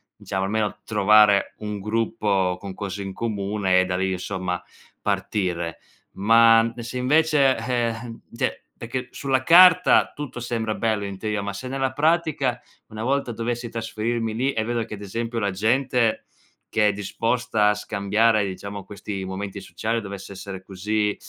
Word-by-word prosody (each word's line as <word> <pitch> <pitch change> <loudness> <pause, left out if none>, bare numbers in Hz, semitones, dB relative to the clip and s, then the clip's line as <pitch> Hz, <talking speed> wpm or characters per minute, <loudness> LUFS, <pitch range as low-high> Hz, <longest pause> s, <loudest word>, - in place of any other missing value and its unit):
diciamo 95 -1 -3
almeno 105 +1 -1
trovare 105 -1 +4
un 105 -1 -5
gruppo 100 -3 0
con 100 -1 -7
cose 100 +1 -5
in 95 -1 -6
comune 100 -3 0
e - - 0
da 90 0 -2
lì, 95 +1 0
insomma, 90 -1 -3 0.4
partire. 85 -5 -2 0.4
Ma 115 +2 +5
e 120 - -7
se 120 +2 -5
invece, 140 0 +3
eh, 120 +1 0
eh 115 0 -6 0.2
cioè - - -2
perché 125 +2 -5
sulla 135 -2 -1
carta 180 +3 +7
tutto 145 -4 -6
sembra 115 -2 -2
bello 110 -2 -1
in 100 -1 -6
teoria, 105 -1 -2
ma 100 0 -4
se 115 +6 -6
nella 135 0 -1
pratica, 150 -5 +1 0.3
una 110 0 -7
volta 135 0 0
dovessi 120 +1 -3
trasferirmi 115 0 -2
lì 130 +5 0
e 110 - 0
vedo 120 0 -1
che, 110 - -7
ad 100 - -12
esempio, 115 +4 -4
la 100 -3 0
gente 120 +3 +1 0.5
che 105 -1 +4
è - - +4
disposta 110 +2 0
a 105 - +2
scambiare 105 +2 +1
diciamo 100 +1 -6
questi 100 -1 -6
momenti 100 +1 -5
sociali 115 +4 -3
dovesse 100 -1 -8
essere 95 -1 -8
così 105 +2 -1
110 Hz, 160 wpm, -24 LUFS, 100-120 Hz, 0.5 s, carta